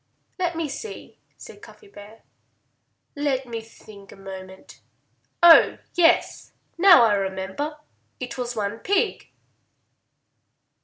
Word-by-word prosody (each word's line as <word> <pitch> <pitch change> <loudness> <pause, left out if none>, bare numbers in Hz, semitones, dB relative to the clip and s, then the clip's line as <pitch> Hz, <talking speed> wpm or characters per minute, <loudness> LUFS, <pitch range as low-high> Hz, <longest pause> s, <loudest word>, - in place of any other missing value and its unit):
"Let 350 -2 -1
me 325 -1 -3
see," 300 +11 -9 0.2
said - - -13
Cuffy 425 - -16
Bear. 215 - -15 0.9
"Let 280 -2 -2
me 230 -1 -6
think 215 -2 -16
a - - -13
moment.... 190 -1 -12 0.6
Oh, 335 -2 +7 0.2
yes! 340 -2 +1 0.2
Now 345 -7 +7
I 225 -2 +3
remember. 195 +9 -4 0.4
It 250 -2 -6
was 245 -1 -5
one 210 +1 -4
pig!" 405 - -1
240 Hz, 110 wpm, -23 LUFS, 200-330 Hz, 0.9 s, Oh